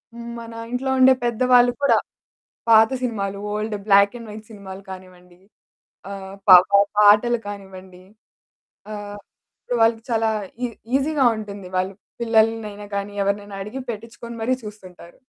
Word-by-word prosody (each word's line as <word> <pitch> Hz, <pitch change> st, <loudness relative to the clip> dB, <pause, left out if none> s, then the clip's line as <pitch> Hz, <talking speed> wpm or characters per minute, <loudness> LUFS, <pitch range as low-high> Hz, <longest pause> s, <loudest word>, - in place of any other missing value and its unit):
హ్మ్. 235 Hz, 0 st, -8 dB
మన 230 Hz, 0 st, -10 dB, 0.2 s
ఇంట్లో 265 Hz, +2 st, -2 dB
ఉండే 260 Hz, 0 st, +7 dB
పెద్ద 240 Hz, 0 st, -2 dB
వాళ్ళు 245 Hz, 0 st, +6 dB
కూడా -, -, +4 dB, 0.7 s
పాత 220 Hz, 0 st, +7 dB
సినిమాలు, 200 Hz, -4 st, -3 dB, 0.2 s
ఓల్డ్, 215 Hz, 0 st, -3 dB
బ్లాక్ 200 Hz, +2 st, +5 dB
అండ్ 230 Hz, -2 st, -10 dB
వైట్ 215 Hz, 0 st, -11 dB
సినిమాలు 195 Hz, -2 st, -10 dB
కానివ్వండి, 180 Hz, -1 st, -13 dB, 0.7 s
ఆహ్, 195 Hz, 0 st, -8 dB
పా 180 Hz, -, +12 dB
పా 200 Hz, -, +6 dB, 0.2 s
పాటలు 215 Hz, +3 st, +5 dB
కానివ్వండి 190 Hz, -2 st, -10 dB, 0.9 s
ఆహ్, 205 Hz, 0 st, -7 dB, 0.6 s
వాళ్ళకి 225 Hz, 0 st, +2 dB
చాలా 225 Hz, -1 st, +1 dB, 0.4 s
ఈ -, -, 0 dB, 0.3 s
ఈసీగా 280 Hz, 0 st, +1 dB
ఉంటుంది. 200 Hz, -3 st, -8 dB
వాళ్ళు 185 Hz, +1 st, -1 dB, 0.3 s
పిల్లల్ని 225 Hz, -1 st, +2 dB
అయినా 205 Hz, 0 st, -10 dB
గానీ, 200 Hz, +1 st, -4 dB
ఎవరినైనా 200 Hz, 0 st, -3 dB
అడిగి 250 Hz, +6 st, -7 dB
పెట్టించుకొని 230 Hz, +2 st, -9 dB
మరి 255 Hz, +2 st, +1 dB
చూస్తుంటారు. 185 Hz, -4 st, -12 dB
210 Hz, 135 wpm, -22 LUFS, 195-230 Hz, 0.9 s, పా